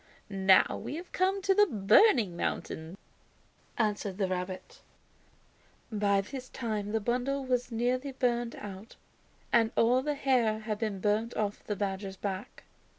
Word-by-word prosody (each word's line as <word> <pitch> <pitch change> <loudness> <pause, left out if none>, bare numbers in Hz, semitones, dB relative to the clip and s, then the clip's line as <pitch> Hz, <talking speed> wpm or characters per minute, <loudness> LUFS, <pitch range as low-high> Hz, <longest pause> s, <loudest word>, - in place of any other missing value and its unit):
"Now 190 -1 +4
we - - -5
have 345 +3 -8
come 380 +1 +1
to 390 0 +4
the 415 +1 +5
'Burning 215 - +4
Mountain,'" 165 +1 -4 0.8
answered 210 -3 -1
the 195 -2 +1
rabbit. 185 0 -5 1.1
By 200 -2 +2
this 255 +5 -8
time 215 -4 -3
the 225 - +1
bundle 250 +5 -1
was 250 -1 -1
nearly 250 +4 0
burned 240 -2 0
out 200 +2 -9 0.6
and 230 -2 +5
all 245 +3 +4
the 295 +2 -1
hair 245 -6 +1
had 215 -1 -3
been 210 -4 -2
burned 215 +3 0
off 205 -1 -2
the 210 - -3
badger's 195 0 -3
back. 195 0 -5
220 Hz, 145 wpm, -30 LUFS, 200-255 Hz, 1.1 s, the